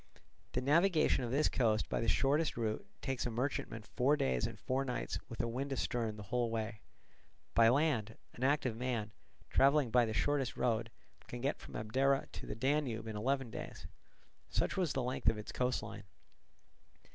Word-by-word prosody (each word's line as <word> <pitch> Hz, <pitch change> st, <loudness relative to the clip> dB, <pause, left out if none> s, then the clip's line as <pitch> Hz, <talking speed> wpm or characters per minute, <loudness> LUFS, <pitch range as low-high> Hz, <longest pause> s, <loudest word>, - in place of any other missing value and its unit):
The 125 Hz, -, 0 dB
navigation 160 Hz, +1 st, +3 dB
of 120 Hz, -, -2 dB
this 140 Hz, +5 st, +3 dB
coast 110 Hz, -4 st, +2 dB
by -, -, -1 dB
the 115 Hz, -, -1 dB
shortest 145 Hz, +5 st, +2 dB
route 110 Hz, -2 st, -2 dB, 0.2 s
takes 130 Hz, -2 st, -1 dB
a -, -, -1 dB
merchantman 120 Hz, -2 st, -2 dB
four 130 Hz, +6 st, +2 dB
days 65 Hz, -, +1 dB
and -, -, -8 dB
four 130 Hz, +1 st, 0 dB
nights 125 Hz, -3 st, -3 dB
with 115 Hz, -, -8 dB
a -, -, -1 dB
wind 130 Hz, +4 st, -3 dB
astern 115 Hz, -4 st, -1 dB
the 105 Hz, -, -7 dB
whole 120 Hz, -1 st, +2 dB
way: 110 Hz, -2 st, -3 dB, 0.7 s
by 115 Hz, -1 st, +6 dB
land 120 Hz, -5 st, +1 dB, 0.2 s
an 125 Hz, -, -6 dB
active 135 Hz, -4 st, +2 dB
man, 115 Hz, -3 st, -2 dB, 0.4 s
travelling 140 Hz, -2 st, +4 dB
by 125 Hz, 0 st, +5 dB
the 110 Hz, -, -3 dB
shortest 135 Hz, +2 st, 0 dB
road, 115 Hz, -1 st, +1 dB, 0.4 s
can 120 Hz, -, -6 dB
get 135 Hz, +4 st, -1 dB
from -, -, -11 dB
Abdera 135 Hz, +6 st, +1 dB
to -, -, -8 dB
the -, -, -4 dB
Danube 130 Hz, -2 st, 0 dB
in 110 Hz, -1 st, -5 dB
eleven 130 Hz, +3 st, 0 dB
days. -, -, -7 dB, 0.6 s
Such -, -, 0 dB
was 180 Hz, -6 st, +1 dB
the 130 Hz, -, 0 dB
length 125 Hz, +1 st, +1 dB
of 110 Hz, -, 0 dB
its 105 Hz, -, -6 dB
coast 125 Hz, 0 st, 0 dB
line. 105 Hz, -2 st, -8 dB
125 Hz, 180 wpm, -35 LUFS, 110-135 Hz, 0.7 s, by